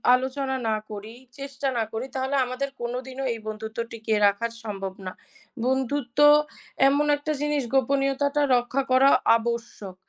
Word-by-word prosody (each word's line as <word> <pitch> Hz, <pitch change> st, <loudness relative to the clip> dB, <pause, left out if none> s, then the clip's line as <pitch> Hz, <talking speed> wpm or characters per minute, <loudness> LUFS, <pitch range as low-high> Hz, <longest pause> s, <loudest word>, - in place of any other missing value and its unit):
আলোচনা 265 Hz, +1 st, -2 dB
না 220 Hz, -, +2 dB, 0.2 s
করি, 210 Hz, +2 st, -8 dB, 0.3 s
চেষ্টা 275 Hz, 0 st, -4 dB
না 225 Hz, -, +2 dB
করি 225 Hz, +3 st, -4 dB
তাহলে 265 Hz, +1 st, -1 dB
আমাদের 255 Hz, +3 st, -3 dB
কোনোদিনও 255 Hz, +2 st, -4 dB
এই 225 Hz, -, -7 dB
বন্ধুত্ব 220 Hz, +1 st, -6 dB
টিকে 220 Hz, -1 st, -3 dB
রাখা 200 Hz, +3 st, +2 dB, 0.2 s
সম্ভব 195 Hz, -3 st, -5 dB
না। 185 Hz, -, -4 dB, 0.5 s
বন্ধুত্ব 265 Hz, 0 st, -1 dB, 0.7 s
এমন 285 Hz, +2 st, +3 dB
একটা 305 Hz, +2 st, -4 dB
জিনিস 295 Hz, -2 st, 0 dB
গোপনীয়তাটা 275 Hz, +2 st, +1 dB
রক্ষা 245 Hz, +3 st, 0 dB
করা 265 Hz, +2 st, +6 dB, 0.3 s
আবশ্যক। 230 Hz, -5 st, -5 dB
255 Hz, 135 wpm, -25 LUFS, 225-275 Hz, 0.7 s, করা